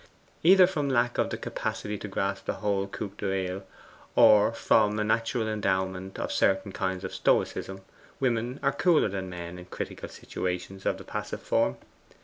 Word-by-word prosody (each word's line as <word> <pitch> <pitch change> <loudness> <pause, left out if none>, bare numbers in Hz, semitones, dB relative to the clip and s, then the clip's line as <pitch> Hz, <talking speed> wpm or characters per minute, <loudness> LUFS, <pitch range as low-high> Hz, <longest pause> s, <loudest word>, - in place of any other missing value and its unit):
Either 185 +2 +8
from 150 -6 -1
lack 120 -2 +1
of - - +2
the - - -3
capacity 105 0 -4
to 105 - -6
grasp 95 0 -2
the - - -1
whole 100 -2 -1
coup 100 0 -5
d'oeil, 95 -1 -2 0.5
or 105 +1 +7
from 105 -2 +3
a 105 - +1
natural 115 +1 0
endowment 95 -2 -1
for - - -3
certain 95 +1 +1
kinds 95 0 -2
of 95 - -5
stoicism, 95 0 0 0.4
women 125 0 0
are 135 - +3
cooler 160 - +3
than 95 -1 -4
men 90 0 -7
in 90 - -10
critical - - -6
situations 90 +1 -4
of - - +1
the - - -10
passive - - -5
form. 65 - +1
100 Hz, 165 wpm, -28 LUFS, 95-115 Hz, 0.5 s, Either